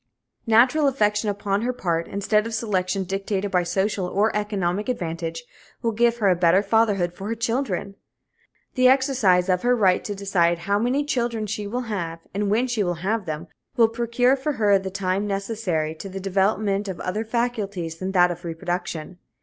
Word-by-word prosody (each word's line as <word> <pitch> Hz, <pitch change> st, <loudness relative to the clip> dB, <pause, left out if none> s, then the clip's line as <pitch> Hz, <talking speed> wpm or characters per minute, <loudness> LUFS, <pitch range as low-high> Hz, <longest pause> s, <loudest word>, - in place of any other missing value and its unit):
Natural 250 Hz, +7 st, +4 dB
affection 210 Hz, -5 st, +1 dB
upon 200 Hz, 0 st, -1 dB
her 245 Hz, +2 st, 0 dB
part, 170 Hz, -9 st, -2 dB
instead 210 Hz, +2 st, 0 dB
of 230 Hz, -, -4 dB
selection 195 Hz, -3 st, -1 dB
dictated 195 Hz, +1 st, -2 dB
by 180 Hz, -, +3 dB
social 190 Hz, +2 st, -1 dB
or 205 Hz, +4 st, +1 dB
economic 205 Hz, -1 st, -1 dB
advantage, 165 Hz, -6 st, -3 dB, 0.4 s
will 230 Hz, -, +1 dB
give 235 Hz, +1 st, +2 dB
her 210 Hz, -4 st, +1 dB
a 185 Hz, -, +4 dB
better 175 Hz, +3 st, +4 dB
fatherhood 205 Hz, -4 st, +2 dB
for 195 Hz, +3 st, -7 dB
her 230 Hz, -, -2 dB
children. 230 Hz, -4 st, -2 dB, 0.8 s
The 255 Hz, -1 st, +4 dB
exercise 255 Hz, -9 st, +3 dB
of 180 Hz, -1 st, +1 dB
her 245 Hz, 0 st, +3 dB
right 190 Hz, -5 st, +3 dB
to 205 Hz, -, -3 dB
decide 180 Hz, -4 st, +1 dB
how 200 Hz, +1 st, +2 dB
many 255 Hz, +6 st, +1 dB
children 235 Hz, -5 st, -1 dB
she 210 Hz, 0 st, -4 dB
will 245 Hz, +5 st, -2 dB
have 175 Hz, -8 st, -4 dB
and 200 Hz, +1 st, -1 dB
when 225 Hz, +5 st, +2 dB
she 240 Hz, -4 st, -1 dB
shall 175 Hz, -3 st, 0 dB
have 195 Hz, +4 st, -2 dB
them 155 Hz, +1 st, -4 dB, 0.3 s
will 230 Hz, -2 st, +5 dB
procure 240 Hz, +3 st, +2 dB
for 275 Hz, +3 st, -2 dB
her 205 Hz, -5 st, +3 dB
the 190 Hz, 0 st, -5 dB
time 195 Hz, +1 st, -1 dB
necessary 195 Hz, -6 st, -2 dB
to 175 Hz, +5 st, -8 dB
the 190 Hz, +1 st, -6 dB
development 195 Hz, +1 st, 0 dB
of 190 Hz, -3 st, -5 dB
other 210 Hz, +4 st, -2 dB
faculties 210 Hz, -8 st, -2 dB
than 190 Hz, +1 st, -3 dB
that 180 Hz, -1 st, +5 dB
of 175 Hz, +1 st, -7 dB
reproduction. 175 Hz, 0 st, -4 dB
200 Hz, 180 wpm, -23 LUFS, 180-225 Hz, 0.8 s, will